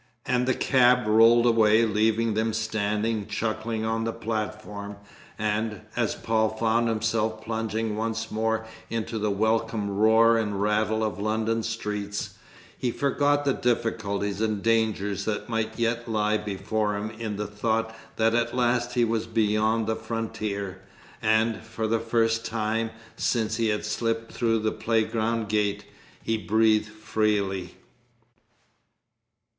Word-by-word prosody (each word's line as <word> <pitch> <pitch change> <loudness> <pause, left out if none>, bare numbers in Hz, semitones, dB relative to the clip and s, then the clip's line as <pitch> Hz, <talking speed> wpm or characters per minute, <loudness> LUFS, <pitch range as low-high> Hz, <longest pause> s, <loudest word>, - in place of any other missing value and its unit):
And 125 0 +1
the 130 - +2
cab 125 -2 +4
rolled 115 +2 +6
away, 115 -1 +5
leaving 110 +1 +1
them 110 +1 0
standing 110 0 -1
chuckling 110 +1 -2
on 115 0 0
the 115 - -1
platform, 105 -2 -4 0.4
and, 105 0 -1
as - - 0
Paul 110 -1 +1
found 115 +1 +1
himself 110 0 -1
plunging 110 -1 -2
once 110 0 -3
more 110 +1 0 0.2
into 115 0 -3
the 105 0 0
welcome 110 0 0
roar 110 +2 +5
and 105 -3 -2
rattle 110 +2 +1
of 110 -2 -2
London 110 +2 0
streets, 105 -2 -4 0.4
he 125 - -1
forgot 145 +3 +1
the 140 - +3
difficulties 105 -5 -1
and 110 -2 -1
dangers 110 -4 +1
that 110 +2 -3
might 110 -1 -2
yet 115 0 -1
lie 105 -1 +1
before 105 +1 -2
him 105 +2 -4
in 110 -2 -5
the 105 +1 -3
thought 110 +2 -1 0.2
that 115 0 +2
at 120 +1 0
last 120 0 +1
he 120 -1 +4
was 115 0 -1
beyond 110 0 +1
the 110 +1 0
frontier, 110 -4 -4 0.4
and, 110 +1 +2
for 110 0 -5
the 115 +1 +1
first 115 0 +1
time 115 0 -1 0.3
since 110 -2 0
he 115 -1 +1
had 105 -1 -1
slipped 115 +1 -2
through 115 -2 +1
the 110 0 0
playground 115 0 0
gate, 105 -1 0 0.4
he 115 - 0
breathed 110 0 +2
freely. 105 -4 -1
110 Hz, 140 wpm, -26 LUFS, 105-115 Hz, 0.4 s, rolled